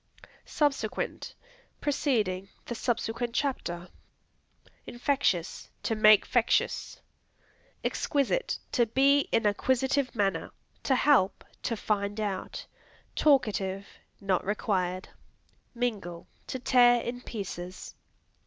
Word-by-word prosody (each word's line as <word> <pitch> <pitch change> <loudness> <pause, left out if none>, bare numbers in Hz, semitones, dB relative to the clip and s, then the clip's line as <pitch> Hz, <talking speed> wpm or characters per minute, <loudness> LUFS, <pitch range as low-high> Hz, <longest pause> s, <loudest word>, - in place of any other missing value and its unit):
Subsequent 275 -7 -1 0.4
Preceding; 215 -10 0 0.2
"The - - -4
subsequent 235 0 -2
chapter." 180 -11 -2 1.0
Infectious 240 - -1
To - - 0
make 215 -1 +6
fectious. 240 -2 +1 0.8
Exquisite 290 - 0
To 240 -3 +2
be 275 +4 +3
in 225 - +2
a 205 - +4
quisitive 260 +2 0
manner. 200 -3 0 0.4
To 265 - +5
help. 255 -8 +3 0.2
To 230 - -2
find 205 0 -1
out. 205 -3 -3 0.5
Talkative. 205 -9 +2 0.3
Not 195 -2 0
required. 185 -3 -1 0.7
Mingle 205 -8 -3 0.2
To - - -3
tear 245 -1 +5
in 245 +1 -4
pieces. 185 -6 -7
225 Hz, 95 wpm, -29 LUFS, 195-260 Hz, 1.0 s, make